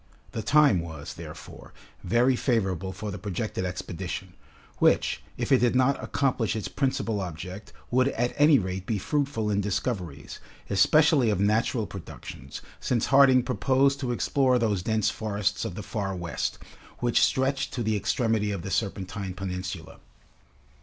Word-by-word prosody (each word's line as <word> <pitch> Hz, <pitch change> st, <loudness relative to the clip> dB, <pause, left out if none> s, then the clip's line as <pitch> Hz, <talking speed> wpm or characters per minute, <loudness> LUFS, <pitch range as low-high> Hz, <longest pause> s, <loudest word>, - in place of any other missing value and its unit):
The 110 Hz, -, -3 dB
time 145 Hz, -4 st, +5 dB
was, 80 Hz, -3 st, -7 dB
therefore, -, -, -11 dB, 0.3 s
very 120 Hz, +7 st, +3 dB
favorable 95 Hz, -, 0 dB
for 105 Hz, +3 st, -5 dB
the -, -, -6 dB
projected 100 Hz, -1 st, -3 dB
expedition, 90 Hz, +1 st, -5 dB, 0.5 s
which, -, -, +3 dB, 0.2 s
if -, -, -3 dB
it 130 Hz, -, +6 dB
did 120 Hz, 0 st, +2 dB
not 130 Hz, +2 st, +2 dB
accomplish 125 Hz, -6 st, 0 dB
its 110 Hz, -, -3 dB
principal 115 Hz, -6 st, -1 dB
object, 90 Hz, +3 st, -7 dB, 0.2 s
would 130 Hz, +2 st, +3 dB
at 120 Hz, -2 st, -1 dB
any 150 Hz, 0 st, +6 dB
rate 95 Hz, -3 st, -3 dB
be 110 Hz, -, 0 dB
fruitful 135 Hz, -1 st, -1 dB
in 100 Hz, 0 st, +1 dB
discoveries, 95 Hz, -, -3 dB, 0.3 s
especially 140 Hz, -, +4 dB
of 100 Hz, -3 st, 0 dB
natural 110 Hz, +2 st, +1 dB
productions, 80 Hz, -8 st, -9 dB, 0.2 s
since 120 Hz, -3 st, 0 dB
Harding 135 Hz, -2 st, +7 dB
proposed 135 Hz, +4 st, +2 dB
to 130 Hz, -3 st, -2 dB
explore 130 Hz, +1 st, +2 dB
those 105 Hz, -6 st, +1 dB
dense 110 Hz, +2 st, +1 dB
forests 105 Hz, 0 st, -2 dB
of 105 Hz, -6 st, -5 dB
the 105 Hz, -, -6 dB
Far 100 Hz, -2 st, -3 dB
West, 85 Hz, -2 st, -3 dB, 0.4 s
which 120 Hz, -1 st, +2 dB
stretched 135 Hz, +1 st, +1 dB
to 120 Hz, -, -1 dB
the 110 Hz, 0 st, +1 dB
extremity 110 Hz, -1 st, 0 dB
of 100 Hz, -4 st, -3 dB
the 95 Hz, -, -5 dB
Serpentine 95 Hz, -1 st, -3 dB
Peninsula. 90 Hz, -3 st, -5 dB
105 Hz, 150 wpm, -27 LUFS, 95-125 Hz, 0.5 s, Harding